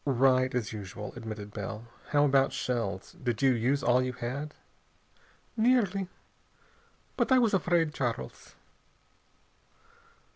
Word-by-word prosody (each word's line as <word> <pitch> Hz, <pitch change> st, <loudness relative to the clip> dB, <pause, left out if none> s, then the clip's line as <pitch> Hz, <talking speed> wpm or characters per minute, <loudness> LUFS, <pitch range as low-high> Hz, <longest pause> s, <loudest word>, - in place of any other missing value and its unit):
"Right, 130 Hz, -1 st, +3 dB
as 120 Hz, -1 st, -2 dB
usual," 105 Hz, 0 st, -7 dB
admitted 110 Hz, -3 st, -7 dB
Bell. 105 Hz, +2 st, -5 dB, 0.2 s
"How 145 Hz, -1 st, +3 dB
about 135 Hz, -1 st, +3 dB
shells? 115 Hz, -7 st, -3 dB
Did 120 Hz, -1 st, -1 dB
you 135 Hz, -, +6 dB
use 130 Hz, +4 st, +1 dB
all 125 Hz, +1 st, +4 dB
you 130 Hz, 0 st, -2 dB
had?" 130 Hz, +5 st, -5 dB, 1.0 s
"Nearly. 220 Hz, -5 st, +2 dB, 1.1 s
But -, -, 0 dB
I 260 Hz, -, +7 dB
was 235 Hz, -4 st, +3 dB
afraid, 170 Hz, -4 st, +2 dB
Charles." 120 Hz, -, -4 dB
130 Hz, 115 wpm, -29 LUFS, 115-150 Hz, 1.1 s, I